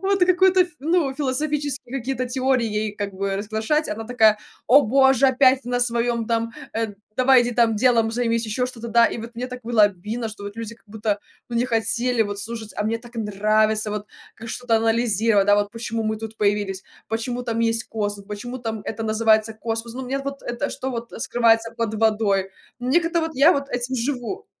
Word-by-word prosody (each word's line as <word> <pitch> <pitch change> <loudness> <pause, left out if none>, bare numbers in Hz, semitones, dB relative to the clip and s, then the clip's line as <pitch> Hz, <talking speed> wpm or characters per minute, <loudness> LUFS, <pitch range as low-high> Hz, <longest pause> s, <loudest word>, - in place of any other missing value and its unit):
вот 390 0 +1
какую-то 370 +1 +4
ф 360 - +3
ну, 315 -1 +1
философские 285 -1 -2
какие-то 255 0 -3
теории 260 -1 +1
ей 210 -1 -2
как 205 -1 -4
бы 195 0 -2
разглашать, 220 +9 -1
она 220 +2 -4
такая: 220 -3 +4 0.3
"О 280 +4 +7
боже, 265 +2 +4
опять 260 0 +4
на 245 0 -1
своём 235 -1 0
там, 230 0 0 0.3
э, 225 -2 -2 0.2
давай 255 0 +6
иди 240 - -1
там 230 -1 +3
делом 230 -1 +3
займись". 230 -1 0
Ещё 235 +4 -1
что-то, 235 -2 -7
да, 235 0 +5
и - - -4
вот 230 +1 -7
мне 250 +2 -3
так 250 0 -8
было 230 -2 +3
обидно, 210 +4 -5
что 210 -1 -9
вот 205 +1 -7
люди 230 0 -6
как 230 - -29
будто, 210 0 -2 0.3
ну, 235 - -2
не 240 +2 +1
хотели 230 +1 +1
вот 205 -1 -4
слушать, 220 +1 -5
а - - 0
мне 225 +2 0
так 240 +1 -14
нравится 215 0 +1
вот 210 0 -4 0.3
ка 230 - -10
что-то 235 +1 -1
анализировать, 225 -2 +2
да, 205 - +6
вот 205 0 0
почему 230 0 -4
мы 215 0 -1
тут 220 0 -7
появились, 200 -2 0 0.3
почему 240 +2 -2
там 230 -2 -2
есть 230 0 +1
космос, 205 -2 -3
почему 245 +5 -6
там 225 -3 -4
это 225 +2 -5
называется 220 0 +2
космос, 230 0 -3
ну, 260 - -5
мне 265 +2 -2
вот 275 0 -6
это, 240 0 -3
что 265 - -4
вот 235 -1 -6
скрывается 230 -1 +2
под 225 -2 -2
водой- 210 -3 +1 0.3
мне 260 +8 +3
как-то 335 0 0
вот 325 0 -2
я 285 +6 +6
вот 280 -3 -2
этим 245 +1 -2
живу. 260 - -3
230 Hz, 200 wpm, -23 LUFS, 220-255 Hz, 0.3 s, О